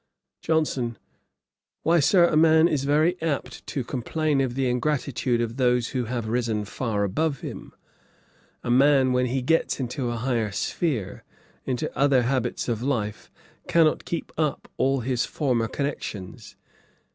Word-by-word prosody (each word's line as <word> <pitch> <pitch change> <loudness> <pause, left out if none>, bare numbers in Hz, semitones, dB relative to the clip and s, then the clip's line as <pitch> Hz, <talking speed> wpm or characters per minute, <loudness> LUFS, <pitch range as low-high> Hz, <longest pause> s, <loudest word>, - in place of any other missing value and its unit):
JOHNSON. 135 -7 0 0.9
'Why, 170 +1 +4
Sir, 170 +5 +5
a 170 - +1
man 160 +1 +6
is 140 -5 -1
very 155 +5 +2
apt 140 -6 -3
to 135 - -3
complain 140 +4 -1
of 125 -2 -1
the 135 -1 0
ingratitude 125 -1 0
of 115 +1 -3
those 125 -2 +2
who 125 -2 -2
have 120 -1 -3
risen 115 -2 -1
far 105 -1 -2
above 140 +8 -1
him. - - -7 0.9
A 120 - -1
man 135 0 +4
when 125 0 +2
he 130 +1 -1
gets 165 +3 +1
into 125 0 -2
a 120 - -2
higher 115 -3 -1
sphere, 120 - -2 0.4
into 125 -2 -3
other 135 -3 +3
habits 125 -1 -1
of 115 -2 -1
life, 120 -6 -2 0.4
cannot 160 -2 +3
keep 170 - -4
up 150 -3 -1
all 135 0 +1
his 125 0 0
former 125 -6 0
connections. 110 -9 -5
130 Hz, 145 wpm, -25 LUFS, 120-150 Hz, 0.9 s, man